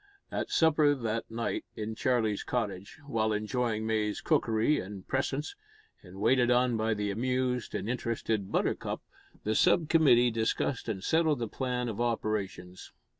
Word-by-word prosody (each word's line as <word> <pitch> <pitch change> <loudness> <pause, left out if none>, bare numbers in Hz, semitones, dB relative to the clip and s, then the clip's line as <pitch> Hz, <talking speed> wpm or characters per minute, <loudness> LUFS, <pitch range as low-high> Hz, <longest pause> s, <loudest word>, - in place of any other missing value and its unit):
At - - -2
supper 150 -2 +4
that 115 -3 -3
night 115 +1 -2
in 110 +1 -4
Charlie's 110 -3 +1
cottage, 105 - -3
while 110 -6 0
enjoying 110 +1 -1
May's 110 -2 0
cookery 140 -2 +2
and 95 0 -8
presence, 135 - -2 0.5
and 95 0 -12
waited 120 +3 +3
on 125 0 +3
by 110 0 0
the 105 -1 -1
amused 125 +1 -1
and - - -3
interested 115 -4 -2
Buttercup, - - -1 0.4
the 110 - 0
sub 160 +7 +3
committee 125 -7 +5
discussed 115 +2 -1
and 95 -4 -3
settled 160 -2 +2
the 115 -1 -3
plan 125 +1 -2
of 115 0 -3
operations. 105 -6 -3
115 Hz, 145 wpm, -30 LUFS, 110-130 Hz, 0.5 s, committee